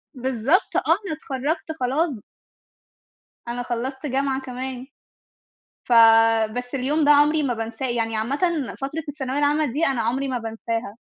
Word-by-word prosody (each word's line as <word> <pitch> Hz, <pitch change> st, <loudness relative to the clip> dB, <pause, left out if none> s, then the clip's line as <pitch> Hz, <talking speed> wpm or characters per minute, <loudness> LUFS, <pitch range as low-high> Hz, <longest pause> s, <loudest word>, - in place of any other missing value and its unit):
بالضبط، 260 Hz, -, 0 dB
آه، -, -, +2 dB
أنا 355 Hz, +1 st, +1 dB
اتخرجت 295 Hz, +3 st, -3 dB
خلاص. 265 Hz, -1 st, 0 dB, 1.3 s
أنا 240 Hz, +1 st, -3 dB
خلَّصت 255 Hz, +4 st, -4 dB
جامعة 270 Hz, -1 st, -1 dB
كمان. 255 Hz, 0 st, -6 dB, 1.0 s
فبس 225 Hz, +1 st, +4 dB
اليوم 285 Hz, +4 st, +1 dB
ده 295 Hz, -, +4 dB
عمري 295 Hz, +1 st, +5 dB
ما 250 Hz, -4 st, 0 dB
بانساه. 225 Hz, +3 st, -4 dB
يعني 225 Hz, -2 st, -1 dB
عامةً 235 Hz, +6 st, -2 dB, 0.4 s
فترة 280 Hz, +4 st, -3 dB
الثانوية 275 Hz, -2 st, -3 dB
العامة 295 Hz, +1 st, +2 dB
دي 305 Hz, +6 st, +1 dB
أنا 265 Hz, -4 st, 0 dB
عمري 265 Hz, +5 st, -1 dB
ما 255 Hz, -, -1 dB
بانساها. 225 Hz, -1 st, -4 dB
260 Hz, 135 wpm, -23 LUFS, 235-290 Hz, 1.3 s, عمري